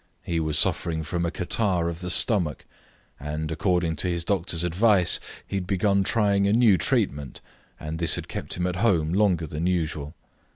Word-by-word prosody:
He 85 -1 -2
was 80 -2 -1
suffering 80 -1 +1
from 85 +2 -2
a - - -1
catarrh 90 0 -1
of 85 0 -4
the 90 - -4
stomach, 90 - +2 0.5
and, 75 +2 -4
according 85 -1 0
to 90 - 0
his 85 -1 -1
doctor's 85 -2 -1
advice, 90 +1 +3 0.3
he 100 - -4
had 90 -2 -4
begun 100 +1 +1
trying 100 -1 +2
a 100 - +2
new 115 -4 +5
treatment, 75 -4 -1 0.4
and 80 +1 -6
this 85 -2 +3
had - - -6
kept - - -5
him 90 - -2
at 90 0 -2
home 90 -7 +1
longer 95 -5 +2
than 75 +3 -3
usual. 80 -4 -2
85 Hz, 180 wpm, -25 LUFS, 80-95 Hz, 0.5 s, new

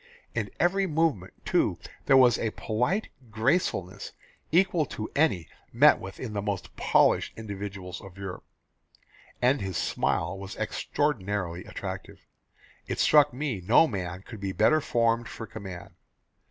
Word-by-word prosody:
In - - -2
every 195 +2 +2
movement, 155 - -1
too, - - +2 0.3
there 135 - +7
was 125 -3 +6
a 115 - 0
polite 125 - -1 0.2
gracefulness 110 - -1 0.4
equal 170 -3 +3
to 110 - -6
any 140 - +2 0.2
met - - +6
with 95 +1 -9
in 115 -4 -5
the 100 - -1
most 100 -1 -4
polished - - +2
individuals 100 -4 -6
of 95 -1 -12
Europe, 95 -2 -6 1.0
and 130 +3 +3
his 95 -3 -3
smile 85 +4 0
was 100 0 -7
extraordinarily 105 - -2
attractive.... - - -7 0.6
It - - -3
struck 150 -1 +5
me 125 -6 -3
no 115 - +5
man 95 - -5
could 110 0 -10
be 95 -1 -3
better 155 +11 +4
formed 115 -3 +1
for 115 - -7
command. 95 -5 -9
110 Hz, 140 wpm, -27 LUFS, 95-140 Hz, 1.0 s, there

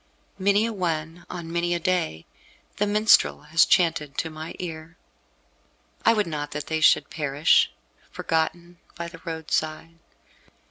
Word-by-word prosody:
Many 200 +3 +3
a 230 - -2
one, 165 -3 -3
on 170 -2 -7
many 175 0 0
a - - -2
day, 160 - -1 0.5
the 205 - +1
minstrel 210 -6 +4
has 155 +2 +3
chanted 160 -5 +2
to 160 - -2
my 155 +1 -8
ear. 165 -1 -7 1.1
I 230 - +5
would 210 -1 +1
not 150 -3 -4
that 150 0 -4
they 160 0 -2
should 150 - +4
perish, 145 0 +3 0.4
forgotten, 170 +2 -2 0.2
by 170 0 -5
the 165 -1 -13
roadside. 160 0 -3
165 Hz, 140 wpm, -25 LUFS, 155-175 Hz, 1.1 s, I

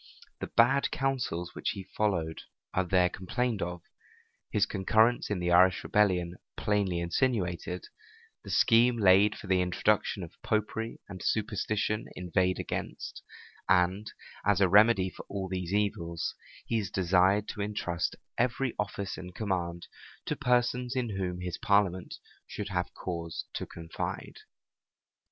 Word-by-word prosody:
The - - -4
bad 135 +4 +4
counsels 125 -11 -2
which - - -2
he 95 - -6
followed 85 -7 0 0.3
are 95 - +2
there 90 0 +3
complained 105 +5 -2
of; 85 0 -4 0.7
his - - +2
concurrence 110 +5 +2
in 105 - 0
the 90 0 -1
Irish 95 +1 +5
rebellion 90 -4 +2 0.2
plainly 100 -4 +1
insinuated; 90 -2 -1 0.6
the - - -10
scheme 120 +1 +4
laid 100 0 +5
for - - -10
the 95 -1 +2
introduction 95 +2 +1
of 85 - -12
Popery 110 +1 -2
and 95 -2 -9
superstition 105 0 -1
inveighed 90 +1 +1
against; - - -5 0.5
and, 95 +3 +2 0.3
as 100 -1 +3
a 100 - +5
remedy 100 -1 +5
for - - -10
all 95 -1 -3
these 90 -1 -4
evils, 85 -5 -1 0.3
he 115 - 0
is 100 - -3
desired 95 +3 +3
to 105 - -4
intrust 100 -4 -2 0.2
every 125 +1 +1
office 100 -1 -3
and 90 0 -9
command 85 -5 -2 0.4
to - - -1
persons 125 +1 +1
in 120 -5 -1
whom 90 -2 -3
his 90 -1 -4
parliament 100 -3 +1 0.3
should 105 -1 -5
have 90 -2 -2
cause 85 -2 -4
to - - -4
confide. 80 -1 -6
95 Hz, 135 wpm, -30 LUFS, 90-110 Hz, 0.7 s, Irish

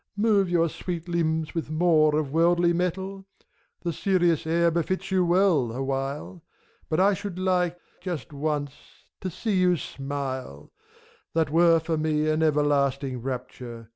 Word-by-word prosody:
Move 205 -3 +3
your 170 -1 +3
sweet 170 +1 -5
limbs 160 -2 -1
with 165 -3 -3
more 155 -2 +3
of 150 -3 -2
worldly 170 +1 +3
mettle! 190 +3 -2 0.6
The 170 -2 -2
serious 175 -4 +1
air 170 +1 +3
befits 185 +3 -2
you 185 -1 +3
well, 175 - +3
awhile, 135 +6 -4 0.5
But 155 - 0
I 200 +2 +5
should 200 -2 -5
like, 180 -2 +1 0.2
just 160 - -5
once, 145 -1 -2 0.5
to 185 - -4
see 205 +4 -2
you 180 -1 +3
smile; 135 - -5 0.6
That 160 -3 +1
were, 165 0 +5
for 160 0 -2
me, 155 0 0
an 155 +1 +1
everlasting 140 -4 +1
rapture. 125 -2 -6
165 Hz, 140 wpm, -26 LUFS, 145-180 Hz, 0.6 s, I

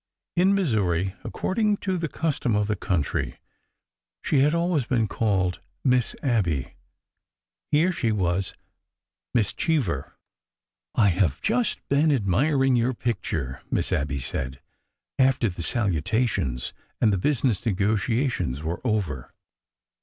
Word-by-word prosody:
In 185 +3 +4
Missouri, 95 - +1
according 210 +1 0
to 190 -2 -1
the 165 -2 -1
custom 145 -7 -1
of 105 0 +2
the 105 0 0
country, 90 -6 -1 0.9
she 145 - +2
had 150 +4 +4
always 170 -5 +1
been 115 -4 +1
called 95 -5 0
" - - -47
Miss 125 -3 +2
Abby 90 - 0 1.0
''—here 160 +5 +4
she 130 -10 0
was 95 -2 0 0.8
Miss 110 -5 +2
Cheever." 125 - -1 0.4
'' - - -44
I - - +6
have 90 -6 +1
just 235 +1 0
been 145 +3 +3
admiring 135 - +2
your 120 +1 +1
picture," 75 - -3
Miss - - 0
Abby 70 0 0
said, 65 0 -3 0.6
after 130 -4 +3
the 85 -1 -6
salutations 95 - 0 0.3
and 110 -3 +4
the 95 - 0
business 125 -3 +1
negotiations 105 - 0
were 80 +2 -3
over. 100 - -2
110 Hz, 125 wpm, -25 LUFS, 90-140 Hz, 1.0 s, I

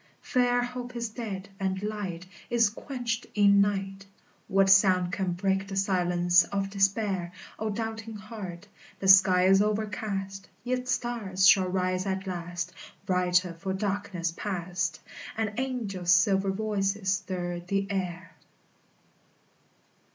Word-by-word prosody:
Fair 245 -2 +2
hope 245 0 -6
is 235 -1 -3
dead, 210 -4 -6
and 190 0 -2
light 200 -5 -4 0.2
Is 230 -3 +3
quenched 245 -1 -4
in 200 -1 +5
night; 195 -1 -2 0.4
What 195 -1 +3
sound 185 -3 +5
can 190 -3 -1
break 195 +2 0
the 195 - -6
silence 180 -2 +3
of 195 -1 -3
despair? 195 -2 0 0.3
O 220 - -1
doubting 225 +1 -4
heart! 205 -3 -8 0.3
The 195 - -3
sky 190 -1 +7
is 195 +1 +5
overcast, 205 -2 -3
Yet 250 +1 -2
stars 215 -7 +1
shall 185 -1 +6
rise 185 +1 -1
at 190 0 -2
last, 175 -1 -4 0.3
Brighter 180 -1 +2
for 190 +3 -4
darkness 190 -3 -2
past; 175 -5 -3 0.4
And 220 -1 -1
angels' 215 -9 -2
silver 195 +2 +4
voices 195 -1 -1
stir 185 -3 -3
the 195 +3 -1
air. 180 -2 -3
195 Hz, 125 wpm, -28 LUFS, 185-210 Hz, 0.4 s, sky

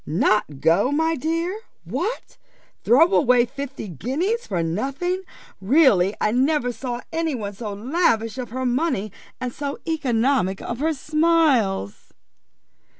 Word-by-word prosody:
"Not 155 -3 0
go, 175 - +3
my 320 +2 +1
dear! 330 +6 -2 0.3
What! 475 - -4 0.4
throw 325 +10 +5
away 250 -6 +4
fifty 275 -2 -7
guineas 300 - -2
for 175 -4 -1
nothing! 275 - -2 0.4
Really 205 - +4
I 210 - +1
never 255 +1 +1
saw 245 0 -5
any 325 -3 -1
one 205 -4 -5
so 210 +1 -6
lavish 230 - 0
of 245 - -5
her 260 +3 -3
money, 245 - 0 0.3
and 250 -1 -4
so 285 -1 -4
economic 255 - +1
of 235 - -5
her 315 +2 0
smiles." 280 - +1
255 Hz, 130 wpm, -22 LUFS, 215-315 Hz, 0.4 s, throw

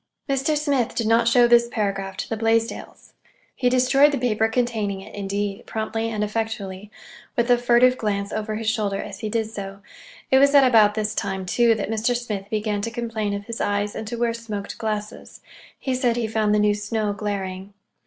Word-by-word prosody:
Mr. 275 +2 +1
Smith 280 -5 0
did 230 - -1
not 230 +1 +3
show 240 0 +5
this 235 0 +5
paragraph 195 -3 -2
to - - -4
the 225 - -2
Blaisdells. 225 +1 -2 0.4
He 250 - +1
destroyed 255 +3 +4
the 285 - -1
paper 225 -3 +1
containing 225 -4 -1
it, - - -12
indeed, 200 0 -3
promptly 225 +1 -2
and 215 -2 -2
effectually—with 215 +2 -4
a 245 - +6
furtive 245 +1 +4
glance 200 -2 -2
over 215 0 -3
his 220 0 -4
shoulder 210 -3 0
as 205 -1 -7
he 215 - -3
did 220 0 -1
so. 195 -2 -7 0.5
It 265 - +6
was 280 +1 +5
at 280 - +8
about 220 -5 +5
this 215 -1 -1
time, 190 -3 -3
too, 230 +4 +3
that 215 0 -3
Mr. 225 +2 +1
Smith 210 -5 -5
began 210 -1 -1
to 230 - -2
complain 225 -3 -3
of 200 0 -6
his 230 +1 -5
eyes 205 0 0
and 220 - -6
to 235 - -4
wear 235 0 +1
smoked 215 -4 -6
glasses. 215 0 -5 0.4
He 260 - -2
said 250 -2 +1
he 240 -1 -1
found 215 -1 +1
the - - +3
new 210 0 +3
snow 210 0 -2
glaring. 195 -1 -5
220 Hz, 195 wpm, -23 LUFS, 205-235 Hz, 0.5 s, at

